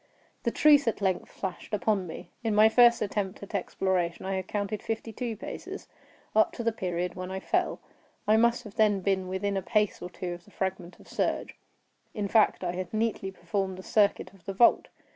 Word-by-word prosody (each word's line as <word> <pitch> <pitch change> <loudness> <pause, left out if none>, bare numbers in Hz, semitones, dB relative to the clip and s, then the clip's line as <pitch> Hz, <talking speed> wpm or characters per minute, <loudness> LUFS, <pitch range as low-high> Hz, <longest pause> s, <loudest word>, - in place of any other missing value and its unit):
The - - +1
truth 290 -3 +5
at 230 - +1
length 190 -3 0
flashed 190 +2 -4
upon 195 -1 0
me. 160 - -9
In 220 -2 +1
my 215 +1 +7
first 235 0 +6
attempt 200 -2 -3
at 200 - -10
exploration 185 -2 -1
I 195 - -1
had 190 -1 -3
counted 205 0 -2
fifty 225 0 -4
two 230 -1 -4
paces, - - -7 0.5
up 220 - +5
to 235 - -5
the 230 - +2
period 180 -4 -2
when 185 0 -6
I 190 0 -3
fell; - - 0 0.5
I 215 - +5
must 235 +2 +3
then 215 -2 +5
have 190 - -5
been 190 -1 +1
within 190 +2 -1
a 195 - 0
pace 210 +2 +1
or 180 - -5
two 180 -1 -5
of 175 0 -11
the - - -18
fragment 185 -2 -4
of - - -17
serge; - - -1 0.6
in 205 -2 -1
fact, 215 -2 +3
I 175 - 0
had 180 0 -5
nearly 220 -3 -1
performed 190 +1 -3
the 185 - -9
circuit 205 -1 +2
of 185 -4 -21
the 195 - -3
vault. 235 +5 +5
195 Hz, 205 wpm, -28 LUFS, 185-220 Hz, 0.6 s, my